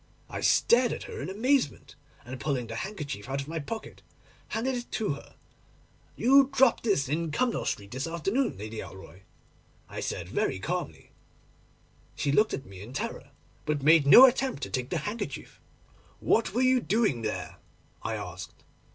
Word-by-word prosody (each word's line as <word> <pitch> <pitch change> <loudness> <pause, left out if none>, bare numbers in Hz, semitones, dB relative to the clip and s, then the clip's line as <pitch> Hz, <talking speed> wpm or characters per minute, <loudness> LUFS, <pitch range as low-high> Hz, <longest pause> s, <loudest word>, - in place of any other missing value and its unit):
I - - -4
stared 240 +1 +4
at - - -6
her - - -7
in 145 - -4
amazement, 230 - 0 0.3
and 125 +1 -7
pulling 135 -5 -1
the 115 0 -7
handkerchief 145 - -5
out 135 +1 -2
of 140 - -5
my 165 +1 -3
pocket, 220 +9 -7 0.5
handed 250 +4 -1
it 245 -1 -5
to 215 - -1
her. 140 - -12 0.8
"You 270 +2 +5
dropped 265 -3 +4
this 170 - +2
in 160 +4 -1
Cumnor 240 +9 0
Street 100 -1 -3
this 130 +5 -3
afternoon, 195 - -1
Lady 110 +2 -7
Alroy," 95 -1 -10 0.7
I - - -7
said - - -4
very - - 0
calmly. - - -4 1.0
She 140 - 0
looked 215 +9 +3
at 135 - -9
me 95 -3 -11
in 115 +5 -10
terror - - -4 0.4
but 150 -2 -1
made 155 -1 +6
no 245 - +11
attempt 260 - +1
to - - -5
take 130 0 -2
the 175 - -1
handkerchief. 220 +3 -5 0.6
"What 225 - +2
were 245 +5 +1
you 255 0 +4
doing 215 - +1
there?" 110 -1 -4 0.4
I - - -3
asked. - - -8
165 Hz, 170 wpm, -28 LUFS, -, 1.0 s, no